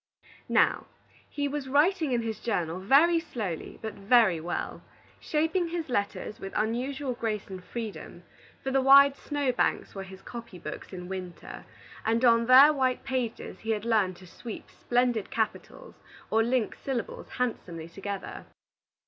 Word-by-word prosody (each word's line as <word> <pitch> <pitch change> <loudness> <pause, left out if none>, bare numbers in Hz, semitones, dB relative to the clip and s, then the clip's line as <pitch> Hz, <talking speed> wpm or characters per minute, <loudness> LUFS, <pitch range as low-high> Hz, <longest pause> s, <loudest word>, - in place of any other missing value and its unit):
Now, - - +3 0.4
he 285 -1 -2
was 280 -1 -4
writing 310 +2 +3
in 240 -2 +1
his 220 -2 -4
journal 180 -7 -2
very 295 - +5
slowly, 220 - -5
but 220 - -4
very 200 -4 +4
well, 175 +2 -4 0.4
shaping 325 +3 0
his 330 -3 -4
letters 205 -2 -2
with 195 - -7
unusual 255 +5 -1
grace 220 -3 -3
and 185 -1 -8
freedom; 200 -6 -7 0.4
for 270 - -2
the 270 0 +3
wide 275 +1 +7
snow 285 -2 -1
banks 245 - 0
were 195 - -6
his 190 0 -11
copy 235 -5 -9
books - - -8
in 180 -2 -7
winter, 185 -2 -7 0.4
and 230 +3 +2
on 230 -1 +5
their 270 +4 +9
white 260 -3 0
pages 255 -4 -3
he 225 - -8
had 215 -1 0
learned 210 -6 +2
to 185 - -14
sweep 220 +5 -9
splendid 245 -3 0
capitals 360 - -3 0.4
or 220 - +4
link 235 0 +1
syllables 260 -4 -4
handsomely 175 -10 -3
together. 195 +3 -6
235 Hz, 150 wpm, -28 LUFS, 200-270 Hz, 0.4 s, their